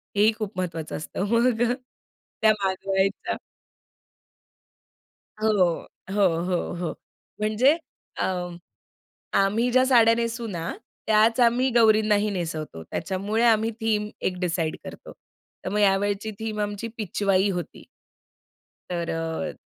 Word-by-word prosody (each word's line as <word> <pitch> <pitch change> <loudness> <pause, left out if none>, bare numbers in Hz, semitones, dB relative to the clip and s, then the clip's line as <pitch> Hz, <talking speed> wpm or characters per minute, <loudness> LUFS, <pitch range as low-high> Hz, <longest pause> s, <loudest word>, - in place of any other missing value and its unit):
हेही 210 +2 +5
खूप 215 -3 -5
महत्वाचं 165 -3 -4
असतं. 170 +5 -4
मग 235 0 +3 0.8
त्या 220 0 +6
मागवायच्या. 190 +1 0 2.0
हो. 220 0 +2 0.6
हो, 205 -2 +4 0.2
हो, 180 -1 -1
हो. 175 -1 -3 0.5
म्हणजे 230 +8 +3 0.4
अ, - - +2 1.1
आम्ही 210 +5 +2
ज्या 255 +1 +4
साड्या 230 -3 +6
नेसू 230 0 -2
ना 170 -5 -4 0.4
त्याच 220 +2 +4
आम्ही 245 +2 +4
गौरींनाही 215 -2 +4
नेसवतो. 160 - -4
त्याच्यामुळे 195 - -2
आम्ही 225 -1 +3
थीम 210 -1 0
एक 180 - -1
डिसाईड 170 -3 -1
करतो. - - -10 0.5
तर - - -1
मग 210 +2 0
यावेळची 205 +1 +2
थीम 220 -1 -4
आमची 205 +2 -3
पिचवाई 200 -1 +1
होती. 180 -3 -5 1.1
तर 170 -1 -2
अ 165 +2 -3
205 Hz, 115 wpm, -25 LUFS, 185-225 Hz, 2.0 s, त्या